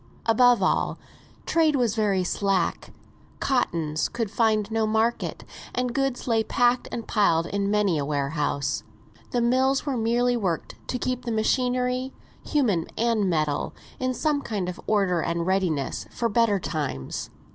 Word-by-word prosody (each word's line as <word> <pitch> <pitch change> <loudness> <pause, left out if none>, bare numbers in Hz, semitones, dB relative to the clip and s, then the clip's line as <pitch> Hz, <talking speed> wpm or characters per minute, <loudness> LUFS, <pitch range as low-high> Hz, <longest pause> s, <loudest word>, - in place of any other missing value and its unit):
Above 235 -2 +5
all, - - +1 0.5
trade 320 -2 +3
was 240 -5 +2
very 205 -4 +1
slack; 190 -1 0 0.5
cottons 165 - 0
could 230 -4 -3
find 220 -1 +1
no 220 -1 +1
market, 220 +2 0 0.3
and 250 -1 -1
goods 270 -1 -1
lay 225 -2 +2
packed 245 +2 +2
and 230 - -5
piled 170 -7 +3
in 200 +2 -1
many 205 -6 +2
a - - -1
warehouse. 145 0 -1 0.5
The 245 - 0
mills 260 +3 +2
were 280 -3 -1
merely 240 +2 +2
worked 185 -8 -2
to 250 - -2
keep 255 0 -2
the 235 - -3
machinery, 250 +3 0 0.3
human 215 - +1
and 225 -4 +2
metal, 155 -4 -1 0.2
in 255 0 -1
some 300 0 0
kind 205 -8 -3
of 180 +1 -6
order 195 -5 +2
and 170 +1 -1
readiness 180 -7 0
for 235 - -1
better 215 -2 +3
times. 145 - -4
220 Hz, 145 wpm, -25 LUFS, 180-245 Hz, 0.5 s, Above